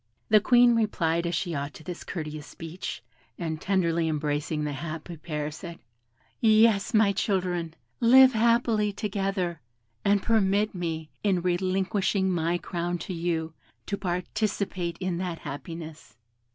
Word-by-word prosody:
The 215 - +7
Queen 240 +2 +5
replied 170 -6 +1
as 170 - -1
she 175 -1 -2
ought 140 -1 -4
to - - -11
this 175 +2 -6
courteous 155 -4 -6
speech, 165 +2 -7 0.3
and 160 -3 -4
tenderly 170 -4 +1
embracing 150 0 -1
the 150 -1 -2
happy 155 +4 -6
pair, 150 -2 -4
said, 170 +2 -8 0.6
"Yes, 220 -2 +4
my 215 -2 +4
children, 180 -5 -1 0.2
live 260 +2 +7
happily 225 -2 +2
together, 195 -4 -2 0.4
and 200 0 +3
permit 210 -1 +2
me, 165 -4 -4
in 190 -4 +1
relinquishing 190 +2 +1
my 170 0 +1
crown 175 0 -3
to 180 +3 -6
you, 165 -2 -2 0.3
to 200 - -2
participate 185 -1 -2
in 185 -2 -2
that 180 -2 -3
happiness." 155 +2 -8
180 Hz, 135 wpm, -27 LUFS, 165-200 Hz, 0.6 s, The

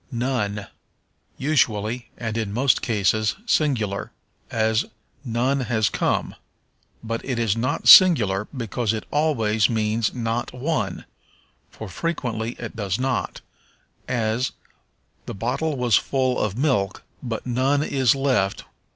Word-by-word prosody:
None. 115 -5 -2 0.7
Usually, 120 -5 0
and 110 -2 -4
in 110 -3 -2
most 125 +4 +2
cases, 110 -1 +1
singular; 120 - 0 0.4
as, 110 0 +1 0.4
None 125 +3 0
has 115 -4 +1
come. - - -1 0.7
But 115 0 -4
it 130 -3 -3
is 115 -3 +1
not 125 +4 -2
singular 105 - +7
because 115 -3 -2
it 110 - -4
always 115 -9 +2
means 110 -1 0
not 120 0 -3
one, 145 +6 -2 0.6
for 110 - -9
frequently 120 - -3
it 115 - -8
does 100 -3 -2
not, 130 -1 -2 0.7
as, 120 0 -1 0.7
The - - -5
bottle 135 +8 -2
was 125 -3 +3
full 130 -2 0
of 105 0 -1
milk, 125 -9 0 0.2
but 115 -4 -5
none 130 +4 +1
is 135 -4 +2
left. 130 -8 0
120 Hz, 120 wpm, -23 LUFS, 110-130 Hz, 0.7 s, singular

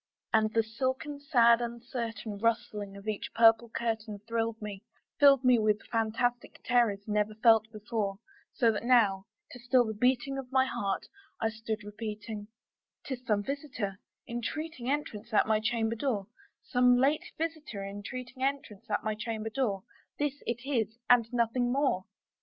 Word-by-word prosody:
And 215 -1 +4
the 225 - +4
silken 260 +6 -3
sad 235 -4 +5
uncertain 235 -3 -5
rustling 210 -3 -1
of 200 +2 -12
each 215 -2 -3
purple 225 0 +6
curtain 220 -2 -2
Thrilled 230 -1 -1
me 205 -2 -6 0.4
filled 275 -2 +7
me 250 -2 +5
with 215 -1 +1
fantastic 235 +2 -1
terrors 230 -5 +2
never 210 0 0
felt 220 0 +4
before; 210 -2 -3 0.3
So 235 -2 +3
that 210 - -3
now, 215 -6 +4 0.3
to 245 - -10
still 245 +1 +3
the 220 - -3
beating 255 +4 +1
of 260 -1 -8
my 260 0 +4
heart, 200 -6 -2 0.3
I 225 - +1
stood 220 0 -4
repeating 210 0 -6 0.6
"'Tis 255 -2 -5
some 205 -2 +2
visitor 250 -8 -4 0.3
entreating 255 +2 -4
entrance 235 -6 -3
at - - +5
my 220 0 +2
chamber 225 0 0
door, 225 -5 -1 0.4
Some 250 -1 +4
late 275 +4 +1
visitor 310 -11 -4
entreating 245 +6 -7
entrance 270 -8 -2
at 210 - 0
my 215 - 0
chamber 220 0 -4
door; 215 -7 -1 0.3
This 290 -1 -2
it 245 +2 -3
is, 230 -5 -1
and 235 -2 +5
nothing 245 +1 +1
more." 265 -8 +1
230 Hz, 155 wpm, -30 LUFS, 215-250 Hz, 0.6 s, filled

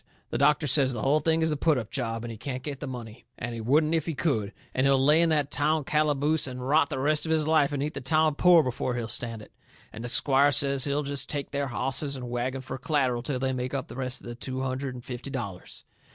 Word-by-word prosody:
The - - -1
doctor 150 +1 +3
says 135 -1 +5
the 110 - -4
hull 145 +3 +3
thing 160 +1 +1
is 160 - +2
a - - +1
put 155 0 +2
up 115 -3 -5
job, 115 -3 -3
and 115 - -5
he 115 - -8
can't 130 0 -5
get 140 -3 -5
the 145 - -5
money, 120 -2 -8
and 120 +1 -5
he 115 - -5
wouldn't 150 +7 +2
if 160 -1 0
he 165 - -2
could, 120 -8 0 0.2
and 130 +1 +2
he'll 135 0 +4
lay 150 +5 +5
in 170 - +3
that 150 -2 +1
town 150 +1 +1
calaboose 150 +1 +1
and 125 0 -6
rot 155 +3 +3
the 140 - -3
rest 150 +4 +1
of - - -1
his 155 -1 +2
life 155 -2 +3
and 140 -1 -2
eat 150 - -3
the 135 - -5
town 155 +3 +2
poor 175 +2 +5
before 125 -1 -2
he'll 120 -2 -3
stand 115 -2 -4
it. - - -16 0.4
And 110 - -7
the 120 - -4
squire 140 +2 +3
says 140 -1 +2
he'll 145 +1 0
jest 140 0 -2
take 145 -2 -4
their 140 -1 -1
hosses 135 +3 -2
and 125 -2 -7
wagon 130 +2 -2
fur 130 0 -7
c'latteral 130 -4 0
till 135 -1 -2
they 130 +1 -1
make 125 +1 -3
up 135 - -4
the - - -9
rest 130 -1 -2
of - - -15
the 120 - -6
two 130 +2 -5
hundred 130 0 -3
and 125 - -10
fifty 125 +2 -6
dollars. 110 -9 -6
135 Hz, 270 wpm, -27 LUFS, 125-150 Hz, 0.4 s, says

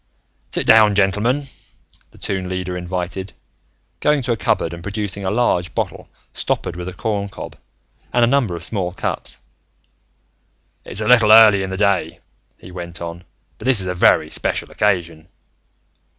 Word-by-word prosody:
"Sit - - -2
down, 105 -2 +6
gentlemen," 105 +8 +1 0.6
the - - -20
Toon 95 -1 -3
Leader 90 -1 -4
invited, 90 +2 -4 0.7
going 150 -2 +2
to 120 - -1
a - - +2
cupboard 90 -3 -1
and 85 - -8
producing 100 +1 -4
a 95 - -1
large 95 -6 0
bottle - - -4 0.2
stoppered - - -2
with 90 0 -6
a 90 - -6
corncob 100 +1 -4 0.6
and 120 0 +3
a - - +5
number 125 -8 +1
of 85 - -6
small 90 -3 -2
cups. - - -4 1.5
"It's 100 - -1
a 110 - -2
little 115 -3 +6
early 110 -3 +8
in 95 - -3
the 95 - -4
day," 100 -1 0 0.4
he 90 - -13
went 85 -1 -7
on, 85 +1 -7 0.3
"but - - -9
this 130 -4 +5
is 95 - +3
a 90 - -2
very 90 - +3
special - - -2
occasion. 85 -5 -1
95 Hz, 160 wpm, -19 LUFS, 90-110 Hz, 1.5 s, early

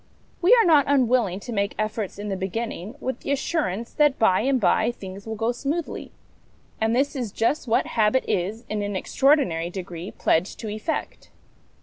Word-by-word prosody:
We 365 +4 +4
are 455 - +5
not 305 -5 +5
unwilling 250 -8 +2
to 240 - -6
make 200 -1 -1
efforts 215 -2 -3
in 205 +1 -5
the 195 - -1
beginning 200 +2 -4
with 260 -2 -3
the - - -4
assurance 250 - -1
that 295 -2 +3
by 190 -5 +4
and 265 +2 +2
by 215 +3 +3
things 195 -2 -10
will 220 - -3
go 225 +2 0
smoothly; 290 +7 -4 0.7
and 220 +1 +2
this 280 +3 +1
is 245 -6 -3
just 240 +7 0
what 225 - +2
habit 225 +3 +2
is, 205 +6 -2
in 215 -1 -2
an 205 -1 -3
extraordinary 190 - +2
degree, 175 -1 -6
pledged 165 +5 0
to 220 - -4
effect. 215 +10 -4
225 Hz, 180 wpm, -24 LUFS, 195-265 Hz, 0.7 s, are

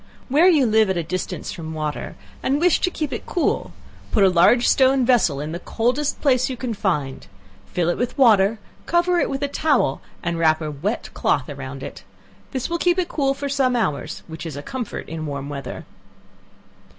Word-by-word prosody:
Where 305 +7 +5
you 310 -8 +5
live 220 -2 +3
at 190 - 0
a 170 - -1
distance 185 +3 -4
from 160 -2 -7
water, 155 -1 -4 0.3
and 275 +2 +1
wish 350 +1 +4
to - - +1
keep 305 -5 -4
it - - -6
cool, 350 - 0 0.4
put 210 - +3
a 190 - +6
large 185 +8 +4
stone 265 -1 +4
vessel 225 - +3
in 150 +2 -4
the 170 - -4
coldest 250 +9 -1
place 255 -3 +3
you 255 - -4
can 240 -1 -3
find; 150 -10 -2 0.4
fill 175 -2 -1
it 175 - 0
with 245 - -2
water, 220 -5 +5 0.3
cover 345 +1 +2
it - - +1
with 270 +1 -3
a - - +1
towel 280 - +1 0.2
and 170 -1 -2
wrap 160 -1 +3
a 155 -2 -4
wet 175 +10 -3
cloth - - 0
around - - -7
it; - - -8 0.5
this 260 -2 -3
will 340 0 -2
keep 350 +1 +2
it 360 -2 0
cool 275 -3 0
for 280 +1 -4
some 265 -2 +1
hours, 155 -9 -2
which 160 -1 -8
is 160 -4 -6
a 145 - -6
comfort 250 - -5
in 160 -1 -5
warm 140 -1 -5
weather. 140 -3 -6
225 Hz, 200 wpm, -22 LUFS, 165-275 Hz, 0.5 s, a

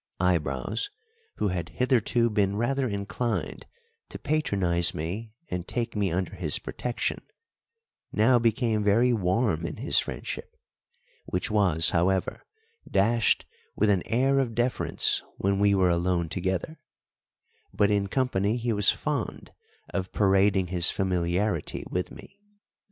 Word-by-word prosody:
Eyebrows, 85 - 0 0.5
who 105 - 0
had 90 -2 -3
hitherto 120 -2 +2
been 100 -2 +1
rather 130 +4 0
inclined 100 +3 -3 0.4
to - - -7
patronise 95 - +1
me 105 +8 -5
and 90 -6 -4
take 120 -2 -3
me 100 -3 0
under 95 +3 -2
his 85 -6 -1
protection, 125 -1 -3 0.9
now 120 +3 +4
became 115 -2 +1
very 115 +5 +3
warm 95 -3 +1
in 85 - -4
his - - +2
friendship, - - -6 0.7
which 90 +4 -2
was, 90 -7 +3
however, 90 +2 0 0.5
dashed 115 +4 +2 0.3
with 105 0 +3
an 95 -3 +2
air 135 +4 +2
of 120 -4 -1
deference 120 +2 +1
when 100 0 0
we 100 0 +4
were 95 -2 +3
alone 85 -1 0
together, 95 - -3 0.9
but 105 0 +2
in 100 -1 +1
company 110 -2 0
he 120 -1 -1
was 105 -1 +3
fond 145 -7 -3 0.4
of 95 -1 -3
parading 95 -1 +3
his 90 -1 +3
familiarity 90 -1 -1
with 90 0 -2
me. 200 - -14
100 Hz, 130 wpm, -27 LUFS, 90-115 Hz, 0.9 s, now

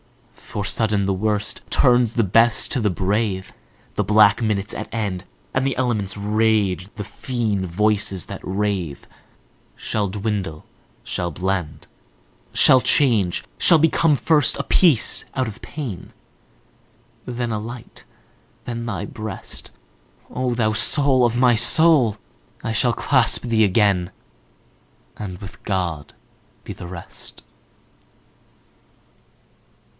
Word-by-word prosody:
For 100 - -7
sudden 105 -1 0
the 95 - 0
worst 105 +1 -2
turns 120 -3 +2
the 115 - +2
best 115 +6 +3
to 130 - -1
the 105 - +1
brave, 95 +1 -2 0.4
The - - 0
black 105 +1 +4
minute's 105 -3 -1
at 110 - -6
end, 100 -5 -3 0.3
And 130 +1 0
the 135 - -1
elements' 105 -7 -1
rage, 105 -3 0
the 105 - -5
fiend 110 -4 -3
voices 105 0 0
that - - -8
rave, 95 -6 -3 0.7
Shall 105 -2 -2
dwindle, 100 -5 -4 0.4
shall 90 -1 -3
blend, 90 -2 -3 0.7
Shall 130 -1 +7
change, 110 -13 +2 0.2
shall 170 - +6
become 160 0 +3
first 150 -1 +2
a - - -3
peace 160 - +3
out 130 -2 0
of 110 -1 -9
pain. 130 - -7 1.1
Then 120 -1 -4
a 110 - -2
light, 115 +2 -9 0.6
then 115 -1 -5
thy 105 -4 -4
breast,O 110 - -7
thou 110 -2 +1
soul 135 +2 +4
of 120 0 0
my 125 -1 +4
soul! 120 -1 +5 0.5
I 115 - -2
shall 120 +2 +2
clasp 130 0 +2
thee 115 -2 +2
again, 100 -3 +2 1.0
And 95 -4 -7
with 95 +1 -12
God 90 -7 -3 0.5
be - - -7
the 90 - -10
rest! 85 -1 -9
110 Hz, 120 wpm, -21 LUFS, 95-120 Hz, 1.1 s, Shall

